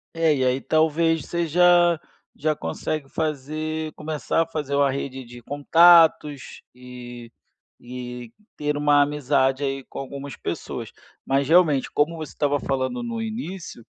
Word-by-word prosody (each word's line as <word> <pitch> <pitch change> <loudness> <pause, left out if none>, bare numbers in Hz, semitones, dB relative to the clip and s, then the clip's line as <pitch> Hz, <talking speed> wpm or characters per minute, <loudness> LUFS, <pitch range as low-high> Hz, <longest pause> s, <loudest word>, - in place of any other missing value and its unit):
É, 165 -1 +3
e 130 -1 0
aí 130 +1 +1
talvez 160 0 +1
você 170 -1 -2
já 175 0 +4 0.4
já 155 0 0
consegue 135 - -4
fazer 155 +1 -3
começar 155 +1 -2
a - - +1
fazer 150 -3 -3
uma 140 -1 +3
rede 135 -1 -5
de 120 0 -12
contatos 155 0 +4
e 120 -2 -11 0.5
e 125 -1 -8 0.2
ter 150 0 -2
uma 145 0 +4
amizade 145 -2 +1
aí 135 -1 -2
com - - -7
algumas 140 +1 -7
pessoas, - - -5 0.3
mas 135 0 +1
realmente, 160 -6 +4
como 155 +3 +1
você 155 -4 -7
estava 145 -1 0
falando 135 - -2
no 230 -1 -4
início. 195 - -6
145 Hz, 140 wpm, -23 LUFS, 135-160 Hz, 0.5 s, já